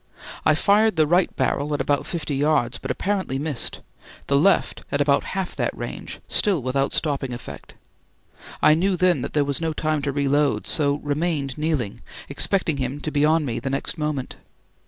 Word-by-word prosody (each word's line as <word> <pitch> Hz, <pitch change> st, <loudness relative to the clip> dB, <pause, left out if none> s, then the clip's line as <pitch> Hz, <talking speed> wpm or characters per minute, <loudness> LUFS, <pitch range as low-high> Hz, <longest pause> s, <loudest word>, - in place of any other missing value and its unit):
I 155 Hz, -, +5 dB
fired 205 Hz, +4 st, +3 dB
the 155 Hz, -1 st, +4 dB
right 175 Hz, +4 st, +3 dB
barrel 145 Hz, +1 st, 0 dB
at -, -, -3 dB
about 145 Hz, +1 st, 0 dB
fifty 155 Hz, -5 st, -3 dB
yards, 140 Hz, -4 st, +1 dB
but 135 Hz, -, -6 dB
apparently 185 Hz, -1 st, -1 dB
missed; 145 Hz, -3 st, -3 dB, 0.4 s
the 140 Hz, -, +1 dB
left 185 Hz, +8 st, +3 dB
at 140 Hz, -, 0 dB
about 140 Hz, -1 st, +3 dB
half 190 Hz, -2 st, -3 dB
that -, -, -1 dB
range, -, -, -6 dB
still 200 Hz, -5 st, +2 dB
without 135 Hz, +2 st, 0 dB
stopping 140 Hz, -4 st, -1 dB
effect. 120 Hz, -, -9 dB, 0.9 s
I 150 Hz, -, +7 dB
knew 185 Hz, +4 st, +1 dB
then 180 Hz, -5 st, +3 dB
that -, -, -5 dB
there 145 Hz, -2 st, +2 dB
was 140 Hz, +2 st, -1 dB
no 160 Hz, -1 st, -1 dB
time 155 Hz, 0 st, 0 dB
reload, 145 Hz, +1 st, +1 dB
so 145 Hz, -2 st, +1 dB
remained 145 Hz, -2 st, -1 dB
kneeling, 150 Hz, -9 st, -2 dB, 0.3 s
expecting 175 Hz, -6 st, +1 dB
him 130 Hz, +2 st, -3 dB
to 155 Hz, -, -4 dB
be 145 Hz, -1 st, +1 dB
on 155 Hz, 0 st, +3 dB
me 120 Hz, -, -2 dB
the 135 Hz, -, -4 dB
next 135 Hz, -, -2 dB
moment. 150 Hz, -4 st, -3 dB
150 Hz, 175 wpm, -23 LUFS, 140-165 Hz, 0.9 s, I